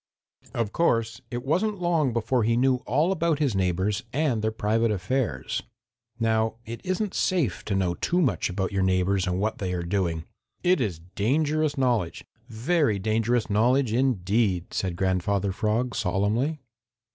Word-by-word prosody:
Of 115 -3 -1
course 115 -9 +1
it 120 0 -5
wasn't 195 +8 0
long 165 -6 +1
before 120 +2 +1
he 115 +2 +2
knew 130 +1 +3
all 150 - +2
about 170 -4 +1
his 140 -6 +1
neighbors 95 +3 0
and 135 -5 0
their 110 - +1
private 110 +1 +1
affairs. 95 - -1 0.6
Now 110 -1 +1
it 115 +1 -7
isn't 185 +2 -1
safe 145 - 0
to 100 - -1
know 95 -2 +1
too 175 - 0
much 145 - +1
about 95 +1 -2
your 100 -1 0
neighbors 95 0 +1
and 90 +1 0
what 110 +2 -1
they 95 -2 -2
are 90 -1 -2
doing. 85 -3 -1 0.4
It 180 -4 +3
is 100 -9 -1 0.2
dangerous 150 +6 +1
knowledge, 120 -11 0 0.2
very 120 - +1
dangerous 110 +3 +1
knowledge 120 +3 +2
indeed," 105 -6 +1
said 95 -3 -1
Grandfather 95 +2 0
Frog 115 +4 0
solemnly. 110 +8 0
115 Hz, 155 wpm, -26 LUFS, 95-135 Hz, 0.6 s, knew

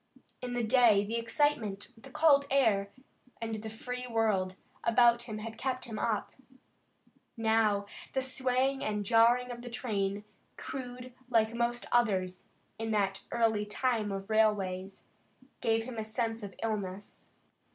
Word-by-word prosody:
In 250 -1 -4
the 240 - 0
day 225 -3 +5
the 225 +3 -2
excitement, 230 -4 0
the 230 +4 -14
cold 280 0 +4
air, 220 -8 +3 0.5
and 225 -2 -4
the 220 - -6
free 250 +3 -6
world 215 -5 +1 0.3
about 235 0 +5
him 215 - -4
had 220 +1 -7
kept 260 -1 -2
him 225 -3 -5
up. 220 -3 -1 1.1
Now 220 -2 +2 0.3
the 265 - +1
swaying 260 +1 0
and 210 -1 -1
jarring 240 +3 +4
of 240 0 -7
the 245 - -7
train, 205 -4 -2 0.3
crude 250 -1 -7 0.2
like 225 -2 +3
most 240 +1 -1
others 190 -6 +1 0.3
in 225 0 -2
that 195 -2 +1
early 225 -3 +2
time 220 -1 0
of 195 0 -4
railways, 195 -3 +1 0.6
gave 225 0 +1
him 235 -1 -6
a - - -2
sense 225 +1 -2
of 200 -2 -8
illness. 205 -3 -4
225 Hz, 140 wpm, -31 LUFS, 210-245 Hz, 1.1 s, day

